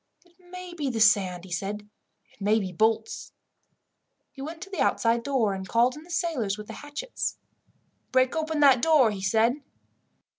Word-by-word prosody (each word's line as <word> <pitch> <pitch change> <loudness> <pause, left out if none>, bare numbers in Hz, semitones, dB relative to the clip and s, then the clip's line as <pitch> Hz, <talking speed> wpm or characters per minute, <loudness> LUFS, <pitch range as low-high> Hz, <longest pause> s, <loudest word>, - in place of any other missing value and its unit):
"It 350 0 -27
may 365 0 -10
be 295 -5 -2
the 235 -3 -3
sand," 190 -5 +3
he 185 - -13
said. 205 +3 -4 0.5
"It - - -27
may 210 +2 +3
be 190 -4 -2
bolts." 220 - 0 1.0
He 270 - -11
went 320 +4 -6
to 390 - -12
the 360 -8 -3
outside 230 -1 +2
door, 235 -6 +1
and 190 0 -6
called 240 +2 +3
in 300 - -10
the 335 - -17
sailors 310 - -1
with 210 - -8
the - - -9
hatchets. 295 +12 -5 0.7
"Break 255 +2 +3
open 315 -1 -1
that 270 -4 +6
door," 295 -8 +5
he 200 -2 -6
said. 225 +6 +2
245 Hz, 180 wpm, -26 LUFS, 210-315 Hz, 1.0 s, that